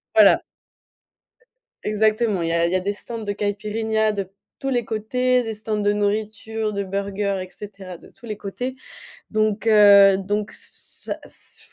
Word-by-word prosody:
Voilà. - - +7 1.4
Exactement, 215 -1 +1
il 165 - -1
y - - 0
a 170 0 +2
il 170 - 0
y - - +1
a - - +3
des 200 +2 -2
stands 230 +3 -5
de 205 - -2
Caïpirinha 215 +2 0
de 200 -3 -4 0.3
tous 270 - -2
les 245 -3 0
côtés. 250 +3 +1
Des 225 -1 -4
stands 215 0 -3
de 205 - +3
nourriture, 215 +1 -2
de 200 0 -1
burgers, 200 0 -2
et - - -17
cetera 195 -3 -9
de - - -17
tous 240 - -17
les 215 -3 -5
côtés 250 +6 -5 0.6
donc 215 0 0
heu, 200 -3 +8
donc 205 +2 -2
ça - - -5
s - - -11
210 Hz, 170 wpm, -22 LUFS, 200-220 Hz, 1.4 s, heu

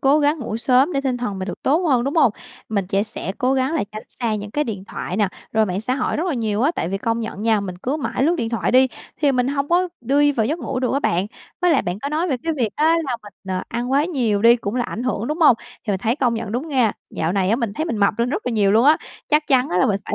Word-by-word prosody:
cố 280 +3 +4
gắng 295 +2 +2
ngủ 225 -4 -4
sớm 260 +7 +3
để 275 - 0
tinh 265 -3 -1
thần 225 -6 -3
mình 185 +1 -4
được - - -7
tốt 280 - +3
hơn, 250 -4 +3
đúng 280 +4 -2
hông? 275 -8 +5 0.4
Mình 200 -4 -1
trẻ 195 +1 +1
sẽ 200 -2 -5
cố 255 +1 +2
gắng 265 +4 0
là 300 - 0
tránh 215 - -6
xa 230 -3 -2
những 210 0 -5
cái 295 +6 0
điện 200 -6 -5
thoại 185 - -5
nè, 210 -2 +2 0.2
rồi 220 -1 +3
mạng 185 +2 -2
xã 250 +4 -1
hội 260 - -1
rất 330 - -1
là 335 - 0
nhiều 220 -1 -1
á, 295 - +4
tại 165 - -2
vì 195 +2 -2
công 230 +2 -1
nhận 220 -2 -5
nha 220 -2 +3
mình 185 -3 -5
cứ 275 +5 -1
mãi 275 -3 -2
lướt 335 +4 +3
điện 230 -6 -2
thoại 230 - -1
đi 260 +1 +6 0.3
thì 285 -2 +2
mình 250 0 +1
hông 280 0 -1
có 360 +2 +2
đi 285 +4 +3
vào 220 -4 0
giấc 315 +6 -1
ngủ 260 -4 -3
được 255 - 0
á 275 - +2
bạn. 180 -6 +1 0.4
Với 355 - +4
lại 290 - +3
bạn 180 +3 -3
có 280 - -4
nói 320 +4 -1
về 265 - +1
cái 330 - -1
việc 235 -4 +1
á 315 +2 +4
là 250 -3 -2
mình, 205 - -12 0.2
ờ, 185 - -2
ăn 240 +2 -3
quá 280 +3 +3
nhiều 235 - 0
đi 235 +1 +7
cũng 215 -1 -4
là 245 -1 0
ảnh 240 - -5
hưởng, 240 -3 -1
đúng 305 +4 -2
hông? 275 -8 +7 0.3
Thì 215 - -2
mình 190 - -1
thấy 230 +5 0
công 245 -5 +1
nhận 225 -2 -4
đúng 260 +7 -3
nghe, 250 -7 +2 0.2
dạo 160 +2 -1
này 195 -1 +1
á 225 - +3
mình 230 -5 -2
thấy 315 - -2
mình 305 -9 -2
mập 200 0 +2
lên 235 - +1
rất 390 - -3
là 250 - 0
nhiều 205 -3 +3
luôn 225 +4 +4
á, 305 +2 +6 0.3
chắc 300 0 +2
chắn 260 -1 +3
á 180 - 0
là - - +4
mình 200 -1 0
phải - - -3
245 Hz, 315 wpm, -21 LUFS, 215-280 Hz, 0.4 s, đi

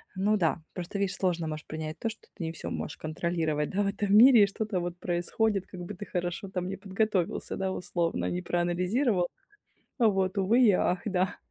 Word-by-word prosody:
Ну 200 +3 +2
да. 165 -3 +1
Просто 180 +2 -5
видишь 195 -1 0
сложно 175 -4 0
можешь 155 0 -5
принять 155 0 -5
то, 230 - -1
что 220 - -11
ты 185 - -6
не 160 - -2
всё 165 - -6
можешь 145 - -4
контролировать, 155 -1 -1
да, 200 - 0
в 200 - +1
этом 200 0 0
мире 235 +1 +9
и - - +4
что-то 200 -2 -2
вот 175 0 -4
происходит, 190 +4 0
как 185 - -10
бы 175 +4 -6
ты 205 +2 -7
хорошо 175 +1 -3
там 180 -1 -3
не 195 - -3
подготовился, 195 -2 -1
да, 190 -1 -1
условно, 175 -2 -1
не 180 - -2
проанализировал. 180 +5 +1 0.7
Вот 195 -5 +2
увы 220 +6 +4
и 230 - +7
ах, 180 0 +1
да. 190 -1 0
185 Hz, 200 wpm, -29 LUFS, 175-205 Hz, 0.7 s, мире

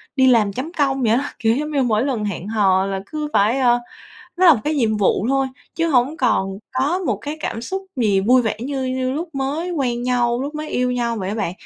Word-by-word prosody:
đi 260 -2 +4
làm 220 -6 +4
chấm 275 +8 -4
công 275 -4 0
vậy 225 -3 +2
á. 270 +5 +1
Kiểu 225 -1 +2
giống 300 +3 -3
như 280 -2 +1
mỗi 225 0 +1
lần 240 -7 -1
hẹn 195 -2 -4
hò 195 -3 +2
là 195 -1 -2
cứ 300 +6 -4
phải, 220 +6 +3
ơ, 245 -2 +4 0.6
nó 370 +1 +4
là 330 - +9
một 225 - -4
cái 305 +1 0
nhiệm 225 -6 +1
vụ 200 +1 +1
thôi, 270 0 +2 0.3
chứ 330 0 0
hổng 270 +2 +2
còn 195 -7 0
có 275 +7 +1
một 375 - -1
cái 295 +1 -5
cảm 225 - -4
xúc 380 +10 -4
gì 210 -5 +2
vui 245 +5 +4
vẻ 220 -2 -1
như 270 +1 -3
như 255 0 -1
lúc 320 +3 -5
mới 285 +6 -2
quen 250 -7 -1
nhau, 245 -1 +1
lúc 290 +2 -5
mới 305 0 -5
yêu 250 0 0
nhau 235 -1 -1
vậy 190 -3 -3
á 205 - -2
bạn. 210 -6 -2
250 Hz, 245 wpm, -20 LUFS, 220-285 Hz, 0.6 s, là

